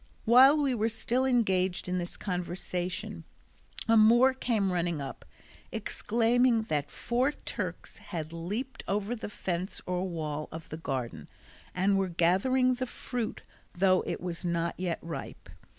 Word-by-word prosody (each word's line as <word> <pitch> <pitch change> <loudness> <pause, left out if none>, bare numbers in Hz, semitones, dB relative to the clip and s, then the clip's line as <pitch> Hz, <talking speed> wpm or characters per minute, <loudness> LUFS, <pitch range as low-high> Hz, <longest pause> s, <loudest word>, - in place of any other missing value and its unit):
While 260 +6 +7
we 270 -2 +2
were 225 -1 +1
still 240 +3 0
engaged 190 -9 +1
in 180 0 0
this 175 0 -6
conversation, 180 +1 -3 0.6
a 225 - +5
Moor 235 +4 +6
came 220 -7 0
running 170 -3 0
up, 135 -2 -7 0.5
exclaiming 235 +1 +2
that 150 -9 -1
four 250 +4 0
Turks - - -6
had 160 -3 -6
leaped 205 +11 -4
over 205 +4 -1
the 220 - -6
fence 185 -2 -3
or 180 +1 -1
wall 155 -3 -4
of 160 0 -8
the 155 - -5
garden, 125 - -4 0.5
and 195 +2 +3
were 190 -1 0
gathering 195 +10 +3
the 255 +1 -3
fruit 240 -1 -4 0.3
though 185 0 +4
it - - -2
was 175 -1 -4
not 170 -1 0
yet 180 -2 -1
ripe. 165 -1 -7
190 Hz, 145 wpm, -30 LUFS, 170-235 Hz, 0.6 s, While